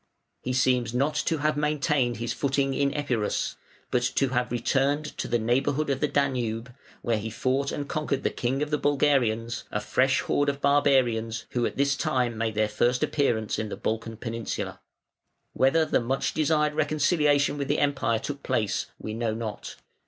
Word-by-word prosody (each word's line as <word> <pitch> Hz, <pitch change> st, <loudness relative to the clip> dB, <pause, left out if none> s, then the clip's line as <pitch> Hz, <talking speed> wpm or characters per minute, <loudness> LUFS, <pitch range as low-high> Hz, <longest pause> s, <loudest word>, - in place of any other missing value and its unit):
He 130 Hz, -, -3 dB
seems 125 Hz, -2 st, +1 dB
not 140 Hz, +4 st, +1 dB
to 165 Hz, -, +2 dB
have 150 Hz, +1 st, +1 dB
maintained 145 Hz, -4 st, +1 dB
his 120 Hz, +1 st, -2 dB
footing 135 Hz, -1 st, 0 dB
in 140 Hz, 0 st, +1 dB
Epirus, 125 Hz, -8 st, -1 dB, 0.4 s
but 125 Hz, -, +2 dB
to 135 Hz, -, +2 dB
have 125 Hz, -1 st, -1 dB
returned 140 Hz, +5 st, 0 dB
to -, -, -2 dB
the 120 Hz, -, +1 dB
neighbourhood 135 Hz, +6 st, +1 dB
of 135 Hz, -, -1 dB
the 150 Hz, -, +1 dB
Danube, 125 Hz, -4 st, -1 dB, 0.3 s
where 115 Hz, -3 st, +1 dB
he 110 Hz, +2 st, -4 dB
fought 130 Hz, +5 st, 0 dB
and 145 Hz, -1 st, -4 dB
conquered 145 Hz, -3 st, -2 dB
the -, -, +1 dB
king 130 Hz, +4 st, -1 dB
of 150 Hz, -, -5 dB
the 150 Hz, -, +1 dB
Bulgarians, 125 Hz, -5 st, +1 dB
a 105 Hz, -, -2 dB
fresh 130 Hz, +5 st, +2 dB
horde 145 Hz, 0 st, +1 dB
of 140 Hz, 0 st, -3 dB
barbarians 125 Hz, -6 st, +2 dB
who 120 Hz, -2 st, +1 dB
at -, -, -7 dB
this 140 Hz, 0 st, +2 dB
time 125 Hz, -4 st, 0 dB
made 110 Hz, -1 st, -2 dB
their 110 Hz, 0 st, +2 dB
first 120 Hz, +4 st, +1 dB
appearance 120 Hz, -7 st, 0 dB
in 110 Hz, -1 st, -3 dB
"the -, -, -5 dB
Balkan 115 Hz, 0 st, -3 dB
peninsula" 115 Hz, -1 st, -4 dB, 0.7 s
Whether 155 Hz, +5 st, +3 dB
the -, -, +1 dB
much 130 Hz, +3 st, -1 dB
desired 150 Hz, -1 st, +2 dB
reconciliation 150 Hz, -1 st, +2 dB
with 140 Hz, -, -2 dB
the -, -, +1 dB
Empire 140 Hz, -5 st, +1 dB
took 140 Hz, +5 st, -5 dB
place 110 Hz, -6 st, -1 dB
we 110 Hz, -, -6 dB
know 115 Hz, -1 st, -1 dB
not. 110 Hz, -2 st, -5 dB
130 Hz, 180 wpm, -26 LUFS, 115-145 Hz, 0.7 s, Whether